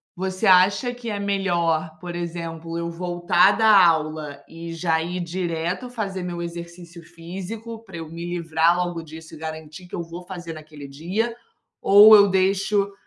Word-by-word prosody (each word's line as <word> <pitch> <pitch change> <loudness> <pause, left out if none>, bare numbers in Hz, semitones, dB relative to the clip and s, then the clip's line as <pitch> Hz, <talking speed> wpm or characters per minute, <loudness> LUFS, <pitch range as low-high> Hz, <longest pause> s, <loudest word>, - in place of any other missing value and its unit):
você 185 +1 -3
acha 195 +7 +4
que 240 -1 -7
é 205 -2 -3
melhor, 170 -5 0
por 175 -1 -7
exemplo, 165 -1 -5
eu 170 0 -3
voltar 175 +2 +2
da 220 -1 +4 0.2
aula 155 -3 -1
e 165 +1 -8
já 165 -1 0
ir 175 +2 -4
direto 175 +5 -3
fazer 200 -6 -4
meu 175 -1 -5
exercício 170 0 -8
físico, 190 +7 -8
pra 190 -5 -10
eu 165 -1 -7
me 165 +1 -7
livrar 170 -1 +1
logo 175 -2 -2
disso 160 0 -11
e - - -11
garantir 160 +2 -8
que - - -7
eu 170 - -3
vou 170 +2 -9
fazer 175 -3 -7
naquele 155 -2 -11
dia? 180 +12 -2 0.5
Ou 210 +2 +9
eu 205 -1 +7
deixo 195 +1 +1
175 Hz, 165 wpm, -23 LUFS, 165-190 Hz, 0.5 s, Ou